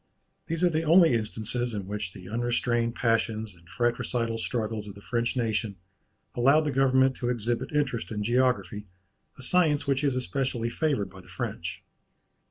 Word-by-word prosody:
These 165 +2 -2
are 180 - +6
the 160 0 +1
only 165 -2 +6
instances 115 +1 -2
in 100 -2 -4
which 100 -1 -4
the 90 0 -11
unrestrained 120 +1 0
passions 110 -2 0
and 85 -1 -21
fratricidal 120 0 -1
struggles 110 -2 -2
of 100 - -9
the - - -11
French 120 +3 -1
nation 110 -3 -1 0.6
allowed 135 +6 +4
the 150 - 0
government 130 0 +3
to 120 - -2
exhibit 120 -1 -1
interest 145 -6 -1
in 105 -2 -3
geography, 105 -4 +1 0.5
a 130 - -7
science 155 -1 +3
which 140 +1 +1
is 140 -3 +2
especially 125 -2 -1
favoured 140 -7 0
by 95 -1 -12
the - - -19
French. - - -5
120 Hz, 165 wpm, -27 LUFS, 110-130 Hz, 0.6 s, are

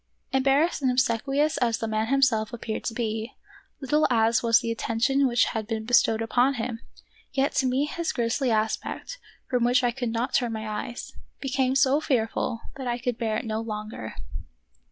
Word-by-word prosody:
Embarrassed 275 +5 +2
and 260 - +2
obsequious 260 +5 +1
as 230 -2 +1
the 225 - -3
man 220 0 0
him 275 +2 +2
self 220 -4 +2
appeared 225 -2 -4
to 230 - -1
be, 225 0 -3 0.5
little 295 +3 +2
as 225 -1 +3
was 230 -1 +5
the 230 - -3
attention 240 +5 +1
which 240 -1 +3
had 220 -2 -3
been 220 -1 -3
bestowed 225 -1 +3
upon 250 +4 +2
him, 230 -1 -3 0.5
yet 275 +1 +1
to 265 - +2
me 260 +3 +1
his 335 +3 -2
grisly 245 +2 0
aspect, 220 - -2 0.3
from 250 -2 +1
which 245 +1 +3
I 245 - +3
could 245 -1 -3
not 230 +3 -2
turn 240 -3 +1
my 220 0 -4
eyes, 215 +3 -5 0.3
became 265 -1 0
so 275 +1 +4
fearful 230 -4 -1 0.2
that 265 -2 -5
I 240 0 0
could 245 -1 -3
bear 220 -2 0
it - - -4
no 220 0 -2
longer. 215 - -6
240 Hz, 185 wpm, -26 LUFS, 225-265 Hz, 0.5 s, was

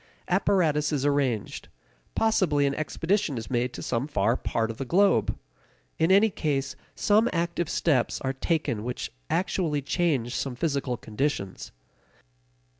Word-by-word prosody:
Apparatus 170 -6 +2
is 145 -2 0
arranged; 140 -7 0 0.5
possibly 185 -10 +2
an 140 - +1
expedition 165 +1 -1
is 115 +3 -6
made 125 0 0
to - - -7
some 115 +5 -1
far 115 -4 +1
part 115 -3 -1
of 110 - -10
the - - -3
globe. 175 - +3 0.6
In 160 +3 +3
any 205 +3 +5
case, 140 -5 -1 0.2
some 215 +3 +3
active 170 -1 -1
steps 135 -8 +1
are 135 0 -1
taken 135 -6 -1
which 125 +1 -4 0.2
actually 170 -5 0
change 140 -7 0
some 135 -3 -2
physical 140 -4 -1
conditions. 110 -4 -3
145 Hz, 135 wpm, -27 LUFS, 125-170 Hz, 0.6 s, any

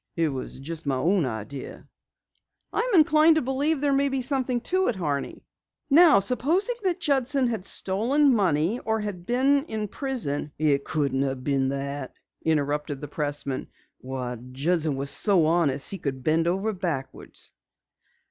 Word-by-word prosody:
It 165 -2 +1
was 130 -1 -6
just 160 +2 -6
my 135 - +1
own 165 +3 +1
idea." 120 +4 -7 0.9
"I'm 460 0 0
inclined 310 0 +6
to 315 - +1
believe 275 +4 0
there 285 -1 +2
may 280 +1 +2
be 265 -1 -2
something 255 -2 +1
to 375 +7 0
it, 240 - 0
Horney. 145 -6 -3 0.5
Now 315 - +7
supposing 320 - 0
that 370 -3 0
Judson 275 -4 +1
had 220 -5 -4
stolen 255 +12 +2
money 190 0 +1
or 220 0 -1
had 190 -4 -6
been 275 +3 +2
in 215 -6 -4
prison 200 - -3
" - - -48
"It 145 -2 +1
couldn't 140 -3 -1
have 135 -2 -2
been 135 -1 +1
that," 140 0 -4 0.3
interrupted 150 -2 -1
the 150 - -7
pressman. 145 -2 -3 0.3
"Why, 125 -2 -5
Judson 155 +2 0
was 140 +1 -1
so 190 -6 +4
honest 155 -4 +1
he 195 - -5
bent 155 +4 0
over 195 +5 0
backwards." 165 -9 -5
175 Hz, 155 wpm, -25 LUFS, -, 0.9 s, Now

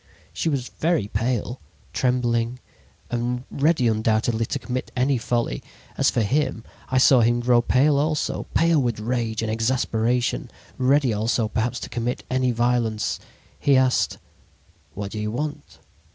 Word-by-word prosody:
"She 165 - -1
was 135 -4 -2
very 155 - +1
pale, 120 +2 -2 0.3
trembling 120 -1 0 0.5
and 120 +1 -1
ready 145 -3 +2
undoubtedly 110 +1 +1
to - - -2
commit 130 -1 -4
any 130 0 +2
folly. 120 - -1 0.3
As - - +3
for - - 0
him, 130 0 0 0.3
I 130 - +1
saw 130 0 +6
him 120 +1 +3
grow 120 0 +4
pale 140 +4 +3
also, 150 0 -1
pale 165 -2 +4
with 120 -4 -1
rage 115 -1 -2
and 110 - -1
exasperation, 115 - 0 0.3
ready 130 -1 +3
also 110 +2 0
perhaps 120 +3 -1
to - - -6
commit 120 +1 -3
any 130 0 +2
violence. 120 -2 0 0.4
"He 140 -2 +4
asked: 130 -1 +2 0.8
"'What 100 0 -5
do 110 - -5
you 105 0 -2
want?' 150 +5 -5
120 Hz, 145 wpm, -23 LUFS, 115-130 Hz, 0.8 s, saw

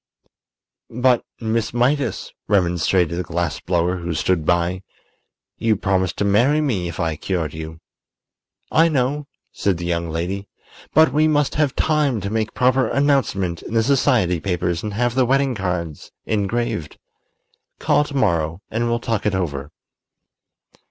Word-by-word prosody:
"But, 125 +1 +2 0.2
Miss 115 0 -1
Mydas," 125 -2 0
remonstrated 90 -3 +1
the - - -1
glass 85 0 -2
blower, 90 +1 0
who 85 -1 -4
stood 80 -2 0
by, 90 +1 +1 0.8
"you 110 -1 +2
promised 95 -2 0
to 100 - 0
marry 120 +10 +3
me 115 - 0
if 85 - -7
I 80 -2 0
cured 80 -1 -3
you." 80 +1 -7 0.9
"I 165 +1 +5
know," 140 0 0 0.2
said 100 -4 0
the 85 - -5
young 85 -1 -1
lady, 90 +5 -3 0.5
"but 160 -3 +5
we 155 +1 +4
must 145 -2 +1
have 150 -3 +1
time 150 -6 +1
to 100 +2 -4
make 110 -1 -2
proper 130 +1 +3
announcement 130 -11 +1
in 115 - -6
the 115 - +4
society 125 - +2
papers 90 -1 -1
and 105 -1 -5
have 120 +1 +1
the 130 +1 +3
wedding 135 +1 +2
cards 90 -7 -4
engraved. 110 -4 -2 0.8
Call - - +2
to 145 - -8
morrow 85 -5 0
and 120 +2 0
we'll 115 - +1
talk 115 -2 -1
it 100 - +1
over." 75 -6 -3
100 Hz, 150 wpm, -21 LUFS, 85-125 Hz, 0.9 s, I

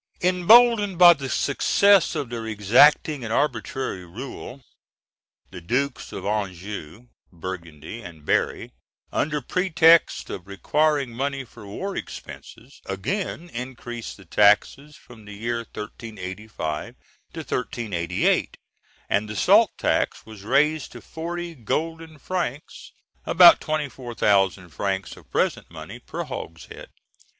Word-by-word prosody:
] - - -38
Emboldened 205 +2 +5
by 175 -1 +9
the 135 -4 -6
success 195 +8 +3
of 140 -6 -4
their 115 -1 -5
exacting 120 +7 +4
and 110 - -5
arbitrary 130 -6 -2
rule, 125 +7 -9 0.9
the 90 -2 -9
Dukes 125 +9 -2
of - - -7
Anjou, 100 +1 -5 0.2
Burgundy, 85 +2 -8
and 80 -6 -12
Berry, - - 0 0.4
under 150 0 -1
pretext 170 0 +3
of 90 0 -7
requiring 145 +7 0
money 135 +3 -3
for 115 -4 -14
war 190 - -5
expenses, 125 +4 -10
again 175 - -3
increased 120 -1 -7
the 95 - -16
taxes 105 - +2
from 115 -7 -16
the 105 - -10
year 115 +3 -2
1385 105 -6 -6 0.4
to - - -7
1388; 100 -9 -1 0.5
and 105 +1 0
the 105 - -5
salt - - +5
tax - - 0
was 110 -2 -12
raised 150 +8 +1
to - - -9
forty 170 +1 -6
golden 160 +5 -4
francs, 150 -3 -5 0.4
about 175 0 +8
24,000 115 - 0
francs 95 +6 -3
of - - -18
present - - -1
money, - - -10
per - - -6
hogshead. 80 0 -8
120 Hz, 120 wpm, -24 LUFS, 100-155 Hz, 0.9 s, by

